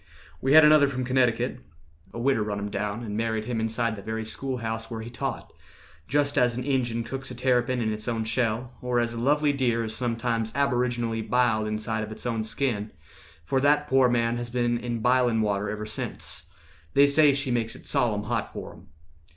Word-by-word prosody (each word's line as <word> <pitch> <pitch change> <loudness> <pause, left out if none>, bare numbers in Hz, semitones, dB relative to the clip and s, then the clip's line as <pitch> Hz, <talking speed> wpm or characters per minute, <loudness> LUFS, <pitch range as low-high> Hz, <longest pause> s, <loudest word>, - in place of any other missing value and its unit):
"We 135 +1 +2
had 155 0 +9
another 150 -1 +6
from 130 -2 -3
Connecticut: 130 -2 +1 0.5
A - - -9
widder 125 -1 +1
run 105 -1 -2
him 100 0 -4
down, 105 +3 -3
and 105 -3 -5
married 110 -1 -1
him 120 -1 -2
Inside 115 0 0
the 100 - -9
very 110 +2 -4
school 130 +3 -3
house 115 -1 -4
where 115 -1 -5
he 115 +2 -8
taught, 120 - -4 0.5
Just 145 +2 +1
as 120 -1 +2
an 125 - -2
Injun 120 -4 0
cooks 130 +2 -6
a 125 - -7
terrapin 125 0 +1
In 110 -1 0
its 105 +1 -7
own 115 -2 -1
shell, 115 +2 -1
or 125 -1 0
as 120 0 0
a 115 - -5
lovely 145 +3 +2
deer 120 -4 +1
Is 110 -1 -4
sometimes 115 -2 -1
aboriginally 120 -4 0
biled 115 -2 +1
Inside 110 +1 -2
of 110 - -7
its 110 - -7
own 115 -2 -1
skin, 110 -2 -1 0.6
for 130 +10 +1
that 145 +1 +3
poor 130 -2 +4
man 120 -1 +1
Has 120 0 -4
been 120 0 0
in 120 -2 -4
bilin' 125 -2 +3
water 100 -1 -1
ever 105 +1 -4
sense: 105 0 -5 0.5
They 140 - +7
say 145 +1 +5
she 140 -1 -1
makes 115 -2 -1
it - - -13
solemn - - +1
hot - - -2
for - - -7
him. - - -17
120 Hz, 205 wpm, -26 LUFS, 110-130 Hz, 0.6 s, had